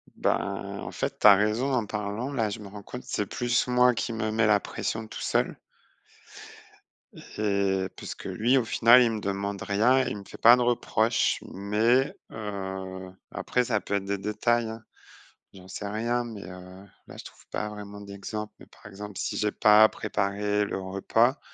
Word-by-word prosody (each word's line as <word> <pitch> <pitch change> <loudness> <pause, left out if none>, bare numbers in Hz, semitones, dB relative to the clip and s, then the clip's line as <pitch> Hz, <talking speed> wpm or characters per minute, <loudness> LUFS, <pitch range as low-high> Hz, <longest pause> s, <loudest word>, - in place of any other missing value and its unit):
Ben, - - -2
en - - -6
fait, - - -4
tu - - +6
as 100 - +10
raison 110 +7 +1
en 120 -4 +1
parlant, 105 +6 -4
là 115 -6 0
je 110 - -5
me 105 - -9
rends 100 +1 -10
compte, 125 +3 -8
c'est 105 - -2
plus 120 +4 0
moi 125 0 +4
qui 115 - -3
me 110 -1 -2
mets 110 0 +2
la 105 -1 +5
pression 110 0 -4
tout - - -8
seul - - 0 1.8
et 100 -2 +1
puisque - - -8
lui, 120 +5 +2
au 125 - +1
final, 120 +3 +6
il 120 -2 +3
me 110 - -3
demande 100 0 -3
rien, 120 +6 +3
il 105 - -3
me 100 - -9
fait - - -11
pas 120 +2 +8
de 125 - -1
reproches, 115 -2 +1
mais, 115 +8 +1 0.2
heu, 95 -3 -6 0.2
après 125 - 0
ça 110 -4 +1
peut 100 - -3
être 100 -1 -1
des 100 0 -1
détails, 115 +3 0
hein. 110 0 -8 0.7
J'en 95 -1 -14
sais 100 +2 -6
rien, 115 +4 -1
mais, 110 -4 -8
heu, 90 +1 -11 0.2
là, - - -11
je - - -8
trouve - - -15
pas 105 - -3
vraiment 105 -1 -9
d'exemple, 105 +1 -6
mais - - -13
par - - -22
exemple, 105 -1 -9
si - - -3
j'ai 105 -1 +1
pas 110 +1 +6
préparé 105 +1 -1
le 100 - -4
repas 115 +7 +1
105 Hz, 185 wpm, -27 LUFS, 100-115 Hz, 1.8 s, as